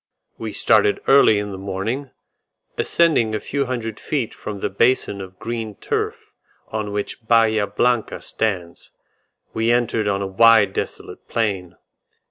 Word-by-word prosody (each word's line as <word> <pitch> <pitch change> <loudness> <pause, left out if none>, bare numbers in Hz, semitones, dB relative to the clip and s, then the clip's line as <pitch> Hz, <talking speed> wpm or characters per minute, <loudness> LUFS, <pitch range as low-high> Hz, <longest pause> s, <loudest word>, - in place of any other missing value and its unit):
We - - -4
started 415 -1 +3
early 135 -6 +6
in 105 0 -3
the 95 - -7
morning; 100 +8 -3 0.7
ascending 145 -10 +2
a - - -1
few 140 +3 -2
hundred 115 -4 -4
feet 135 -7 -2
from 105 -2 -7
the - - -1
basin 105 -1 +1
of 95 -1 -10
green 115 -2 -5
turf - - -3 0.4
on 110 -1 -3
which 105 +3 -5
Bahia 110 -3 +3
Blanca 120 +3 0
stands, 95 -6 -3 0.6
we 115 +1 0
entered 115 -3 +1
on 100 -1 0
a - - -2
wide 110 +2 +5
desolate - - -6
plain. 95 -6 -2
110 Hz, 140 wpm, -21 LUFS, 100-120 Hz, 0.7 s, early